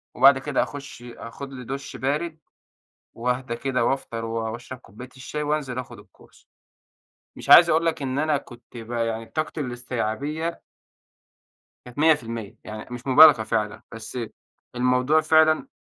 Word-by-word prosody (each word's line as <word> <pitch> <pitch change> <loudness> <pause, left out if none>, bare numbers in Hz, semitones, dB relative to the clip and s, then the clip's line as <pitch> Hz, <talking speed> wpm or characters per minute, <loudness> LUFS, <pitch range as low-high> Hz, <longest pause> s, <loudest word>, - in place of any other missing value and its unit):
وبَعد 135 +2 +7
كده 140 0 0
أخُش 140 -4 -9
آخد 125 +3 -9
لي 125 -2 -8
دُش 135 +2 -6
بارد 155 +4 -2 0.8
وأهدا 125 +1 -2
كده 125 -1 -1
وأفطر 115 -4 -2
و 115 -1 -3
وأشرب 125 +2 -8
كوباية 120 +6 -12
الشاي 150 +3 -5
وأنزل 145 -4 -2
آخد 125 - -7
الCourse. - - -23 0.9
مش - - -10
عايز 170 0 +9
أقُول 165 +1 +2
لك 160 -3 0
إن 135 +1 -2
أنا 155 -1 +2
كنت 120 -1 -13
ب 115 +1 -9
يعني 115 -1 -2
طاقتي 155 +3 -3
الاستيعابية 130 +6 -3 1.2
كانت 125 +2 -13
100% 115 -9 +1
يعني 110 0 -8
مش 125 +2 -8
مبالغة 130 -3 +8
فعلًا، 105 -2 -2
بس 115 +2 -8 0.6
الموضوع 125 +5 +3
فعلًا 155 - +4
130 Hz, 140 wpm, -24 LUFS, 115-150 Hz, 1.2 s, عايز